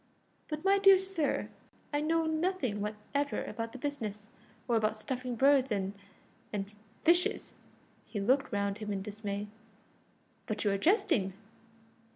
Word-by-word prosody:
"But, 305 Hz, +2 st, -5 dB
my 395 Hz, +1 st, +5 dB
dear 390 Hz, -1 st, +8 dB
sir, 375 Hz, -5 st, -1 dB, 0.4 s
I 290 Hz, -, +2 dB
know 325 Hz, +1 st, +2 dB
nothing 315 Hz, -, 0 dB
whatever 215 Hz, +8 st, -2 dB
about 230 Hz, -1 st, -4 dB
the -, -, -8 dB
business, 220 Hz, -7 st, -4 dB, 0.4 s
or 240 Hz, -, +2 dB
about 215 Hz, -1 st, +1 dB
stuffing 250 Hz, +2 st, -4 dB
birds 270 Hz, +1 st, +4 dB
and 195 Hz, -1 st, -1 dB, 0.6 s
and 205 Hz, 0 st, -4 dB, 0.3 s
fishes." 345 Hz, +2 st, +2 dB, 0.5 s
He 210 Hz, -, -4 dB
looked 260 Hz, +7 st, +2 dB
round 200 Hz, 0 st, -1 dB
him 210 Hz, -1 st, -4 dB
in 195 Hz, -1 st, -2 dB
dismay. 205 Hz, 0 st, -4 dB, 1.0 s
"But 215 Hz, -1 st, -2 dB
you 205 Hz, -, +2 dB
are 195 Hz, -, +1 dB
jesting!" 245 Hz, -, +2 dB
235 Hz, 140 wpm, -32 LUFS, 210-305 Hz, 1.0 s, dear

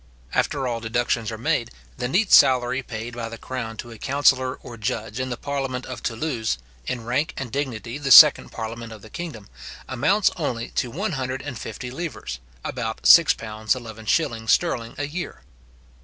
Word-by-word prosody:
After 135 Hz, -3 st, 0 dB
all 120 Hz, -2 st, -2 dB
deductions 115 Hz, -1 st, -1 dB
are 110 Hz, -, -5 dB
made, 115 Hz, -, 0 dB, 0.3 s
the 125 Hz, -, -1 dB
neat 190 Hz, -, +2 dB
salary 130 Hz, 0 st, +6 dB
paid 115 Hz, -1 st, -6 dB
by 115 Hz, -1 st, -5 dB
the 115 Hz, -, -8 dB
crown 115 Hz, -2 st, -5 dB
to 120 Hz, -, -7 dB
a 115 Hz, -, -11 dB
counsellor 130 Hz, -2 st, +2 dB
or 120 Hz, -, -9 dB
judge 110 Hz, 0 st, -3 dB
in 130 Hz, 0 st, -2 dB
the 120 Hz, -, -3 dB
parliament 135 Hz, -2 st, -3 dB
of 130 Hz, -3 st, -6 dB
Thoulouse, 115 Hz, -, -2 dB, 0.3 s
in 120 Hz, -3 st, -3 dB
rank 130 Hz, +6 st, -1 dB
and 130 Hz, -4 st, -5 dB
dignity 125 Hz, -2 st, -3 dB
the 140 Hz, -1 st, -3 dB
second 130 Hz, -, +9 dB
parliament 115 Hz, 0 st, -6 dB
of 110 Hz, -3 st, -11 dB
the 110 Hz, -, -13 dB
kingdom, 155 Hz, -12 st, -7 dB, 0.4 s
amounts 155 Hz, -, +2 dB
only 120 Hz, -8 st, -2 dB
to 125 Hz, -, -1 dB
150 130 Hz, -, -4 dB
livres, 135 Hz, -, -5 dB, 0.3 s
about 115 Hz, -3 st, -4 dB
£6:11s. 110 Hz, -2 st, +3 dB
sterling 120 Hz, -10 st, +1 dB
a 145 Hz, -, -2 dB
year. 150 Hz, -, -6 dB
125 Hz, 155 wpm, -24 LUFS, 115-135 Hz, 0.4 s, second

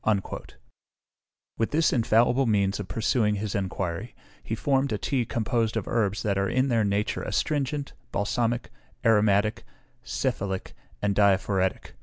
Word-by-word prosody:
" 105 Hz, -3 st, -7 dB
With 115 Hz, -, +1 dB
this 160 Hz, +1 st, +2 dB
infallible 120 Hz, +2 st, +3 dB
means 100 Hz, -2 st, +2 dB
of 100 Hz, -, -5 dB
pursuing 105 Hz, +2 st, +1 dB
his 105 Hz, 0 st, -3 dB
enquiry, 95 Hz, +1 st, -3 dB, 0.3 s
he 110 Hz, -, -3 dB
formed 135 Hz, +2 st, +1 dB
a 105 Hz, -, 0 dB
tea 125 Hz, +2 st, 0 dB
composed 115 Hz, -1 st, 0 dB
of 110 Hz, -, -3 dB
herbs 105 Hz, -3 st, 0 dB
that 100 Hz, -2 st, +1 dB
are 100 Hz, -, +1 dB
in 130 Hz, +2 st, +1 dB
their 115 Hz, -3 st, +3 dB
nature 100 Hz, +1 st, 0 dB
astringent, 145 Hz, -1 st, -1 dB, 0.2 s
balsamic, 115 Hz, +3 st, -1 dB, 0.3 s
aromatic, 105 Hz, -1 st, +3 dB, 0.4 s
cephalic, 100 Hz, -6 st, -2 dB, 0.3 s
and 100 Hz, -1 st, +1 dB
diaphoretic. 95 Hz, -2 st, +2 dB
110 Hz, 135 wpm, -26 LUFS, 100-120 Hz, 0.4 s, infallible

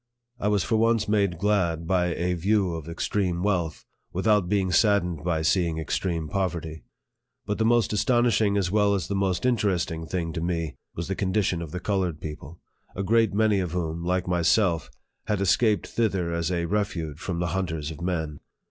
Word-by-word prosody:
I 105 Hz, -, -1 dB
was 105 Hz, -2 st, +2 dB
for 110 Hz, -, +1 dB
once 115 Hz, 0 st, +2 dB
made 100 Hz, -4 st, +1 dB
glad 85 Hz, -4 st, +1 dB
by 90 Hz, 0 st, +2 dB
a 90 Hz, +1 st, 0 dB
view 95 Hz, +1 st, +1 dB
of 80 Hz, -1 st, -6 dB
extreme 90 Hz, 0 st, -1 dB
wealth, 90 Hz, -6 st, -1 dB, 0.3 s
without 95 Hz, 0 st, +2 dB
being 95 Hz, -2 st, +1 dB
saddened 90 Hz, -6 st, +2 dB
by 80 Hz, -2 st, 0 dB
seeing 85 Hz, -1 st, +1 dB
extreme 80 Hz, 0 st, -2 dB
poverty. 85 Hz, -4 st, -3 dB, 0.6 s
But 105 Hz, -, -2 dB
the 110 Hz, -, +2 dB
most 120 Hz, -1 st, +3 dB
astonishing 110 Hz, -2 st, +2 dB
as 95 Hz, -3 st, 0 dB
well 105 Hz, -1 st, +3 dB
as 90 Hz, -4 st, -2 dB
the -, -, -3 dB
most 95 Hz, +2 st, 0 dB
interesting 90 Hz, -9 st, 0 dB
thing 85 Hz, -1 st, -2 dB
to 80 Hz, -, -3 dB
me 85 Hz, -3 st, -2 dB, 0.2 s
was 85 Hz, -, -4 dB
the 95 Hz, -, -1 dB
con 95 Hz, -1 st, -1 dB
dition 95 Hz, -4 st, +1 dB
of 85 Hz, -, -6 dB
the 90 Hz, +4 st, -5 dB
colored 95 Hz, -6 st, -1 dB
people, 75 Hz, +1 st, -8 dB, 0.4 s
a 100 Hz, -, -2 dB
great 110 Hz, 0 st, +2 dB
many 105 Hz, -2 st, +3 dB
of 90 Hz, -3 st, -3 dB
whom, 85 Hz, -2 st, -2 dB
like 90 Hz, +1 st, 0 dB
myself, 90 Hz, 0 st, +2 dB, 0.4 s
had 105 Hz, -2 st, 0 dB
escaped 105 Hz, +3 st, +2 dB
thither 95 Hz, -7 st, -1 dB
as 85 Hz, +1 st, -1 dB
a 85 Hz, -1 st, 0 dB
refuge 85 Hz, -6 st, -2 dB
from 85 Hz, -1 st, -3 dB
the 90 Hz, -1 st, -1 dB
hunters 80 Hz, -5 st, -2 dB
of 80 Hz, -, -9 dB
men. 80 Hz, -4 st, -2 dB
90 Hz, 185 wpm, -26 LUFS, 85-105 Hz, 0.6 s, most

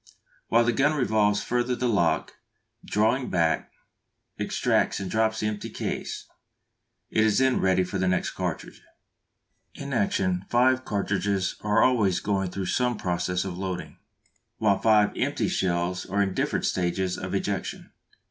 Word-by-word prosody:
While 115 Hz, +1 st, +4 dB
the 120 Hz, -, +2 dB
gun 145 Hz, +6 st, +2 dB
revolves 105 Hz, -5 st, +2 dB
further 125 Hz, +1 st, 0 dB
the 125 Hz, -, -1 dB
lock, 100 Hz, -8 st, +1 dB, 0.5 s
drawing 115 Hz, +5 st, +1 dB
back, 85 Hz, -3 st, 0 dB, 0.7 s
extracts -, -, +1 dB
and 95 Hz, -2 st, -5 dB
drops 110 Hz, 0 st, +1 dB
the -, -, -1 dB
empty 105 Hz, -1 st, -4 dB
case; -, -, -4 dB, 0.9 s
it 110 Hz, -, +3 dB
is 110 Hz, -2 st, +3 dB
then 130 Hz, -1 st, +3 dB
ready 95 Hz, -1 st, +3 dB
for 95 Hz, +1 st, -4 dB
the 95 Hz, -, +1 dB
next 90 Hz, 0 st, 0 dB
cartridge. -, -, -5 dB, 0.9 s
In 140 Hz, -1 st, -6 dB
action 95 Hz, -4 st, 0 dB
five 130 Hz, +2 st, +3 dB
cartridges 100 Hz, -2 st, -1 dB
are 105 Hz, +1 st, +3 dB
always 105 Hz, -8 st, +3 dB
going 95 Hz, -1 st, -1 dB
through 95 Hz, +1 st, -4 dB
some 125 Hz, +5 st, 0 dB
process 90 Hz, 0 st, -1 dB
of 90 Hz, -2 st, -5 dB
loading, 95 Hz, -2 st, -5 dB, 0.6 s
while 100 Hz, -3 st, +2 dB
five 105 Hz, -1 st, +4 dB
empty -, -, 0 dB
shells 90 Hz, 0 st, -1 dB
are 100 Hz, +2 st, +1 dB
in 95 Hz, -1 st, -2 dB
different -, -, -1 dB
stages 90 Hz, +1 st, 0 dB
of 95 Hz, +1 st, -4 dB
ejection. 100 Hz, -1 st, -3 dB
100 Hz, 150 wpm, -26 LUFS, 95-115 Hz, 0.9 s, While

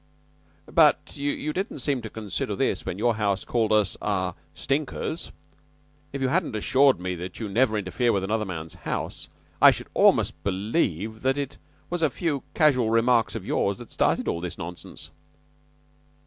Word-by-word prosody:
"But -, -, +3 dB
you 145 Hz, +1 st, -2 dB
didn't 190 Hz, +5 st, -3 dB
seem 135 Hz, -1 st, -1 dB
to 110 Hz, -, -7 dB
consider 105 Hz, -4 st, -3 dB
this -, -, -1 dB
when 90 Hz, -, -3 dB
your 115 Hz, +1 st, +1 dB
house 100 Hz, -2 st, 0 dB
called 115 Hz, -3 st, 0 dB
us 105 Hz, -3 st, +3 dB
ah 95 Hz, -4 st, -1 dB, 0.2 s
stinkers. 150 Hz, +3 st, -2 dB, 0.8 s
If 140 Hz, -1 st, -3 dB
you 130 Hz, -, +2 dB
hadn't 165 Hz, -6 st, 0 dB
assured 130 Hz, +4 st, +4 dB
me 90 Hz, 0 st, -3 dB
that 90 Hz, +1 st, -7 dB
you 110 Hz, -, -3 dB
never 110 Hz, +2 st, +2 dB
interfere 105 Hz, +5 st, 0 dB
with 100 Hz, -3 st, 0 dB
another 105 Hz, +3 st, 0 dB
man's 80 Hz, -3 st, -6 dB
house, 90 Hz, -, -5 dB, 0.3 s
I -, -, +10 dB
should -, -, -2 dB
almost -, -, +3 dB
believe 100 Hz, -, -1 dB
that 135 Hz, +2 st, +1 dB
it 140 Hz, -1 st, -4 dB, 0.3 s
was 175 Hz, -1 st, -2 dB
a 160 Hz, -, +4 dB
few 145 Hz, -1 st, -2 dB
casual 135 Hz, -8 st, +4 dB
remarks 115 Hz, 0 st, +3 dB
of 105 Hz, -4 st, -5 dB
yours 100 Hz, -1 st, 0 dB
that 120 Hz, -, -11 dB
started -, -, +1 dB
all 85 Hz, -, -1 dB
this 90 Hz, -1 st, -5 dB
nonsense." 85 Hz, 0 st, -8 dB
110 Hz, 165 wpm, -26 LUFS, 95-135 Hz, 0.8 s, I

